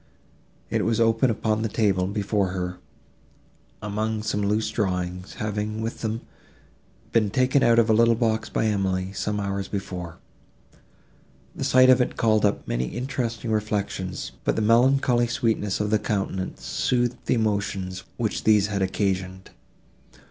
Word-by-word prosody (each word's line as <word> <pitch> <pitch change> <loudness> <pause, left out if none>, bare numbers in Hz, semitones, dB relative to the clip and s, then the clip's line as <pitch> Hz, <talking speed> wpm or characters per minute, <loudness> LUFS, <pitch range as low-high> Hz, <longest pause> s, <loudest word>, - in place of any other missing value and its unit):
It - - +1
was 115 0 +1
open 115 +2 +3
upon 110 -1 0
the 110 - -1
table, 100 -4 +1
before 100 0 0
her, 90 -1 -4 1.0
among 105 +1 -2
some 105 -1 -1
loose 105 +2 0
drawings, 90 -3 -2
having, 105 0 -3
with 115 +1 -4
them, 110 0 -2 0.9
been 110 -3 +2
taken 130 +5 +2
out 115 -2 +4
of 115 -1 +5
a 110 - +4
little 115 +1 +4
box 110 -1 0
by - - 0
Emily, 95 -3 0
some 105 +1 -2
hours 100 -1 -2
before. 90 -4 -5 1.4
The - - -4
sight 130 0 +6
of 130 0 +5
it 125 - -1
called 110 -2 +3
up 100 - 0
many - - -1
interesting 120 - -3
reflections, 105 -4 -2
but - - +1
the 110 - 0
melancholy 120 +2 +4
sweetness 110 -4 0
of 105 0 -1
the 110 - +3
countenance 95 -3 -3
soothed 120 -1 0
the - - +3
emotions, 100 -4 -1 0.2
which 115 -3 -2
these 105 -2 +4
had 100 - -1
occasioned. 95 -1 -2
105 Hz, 150 wpm, -25 LUFS, 95-115 Hz, 1.4 s, sight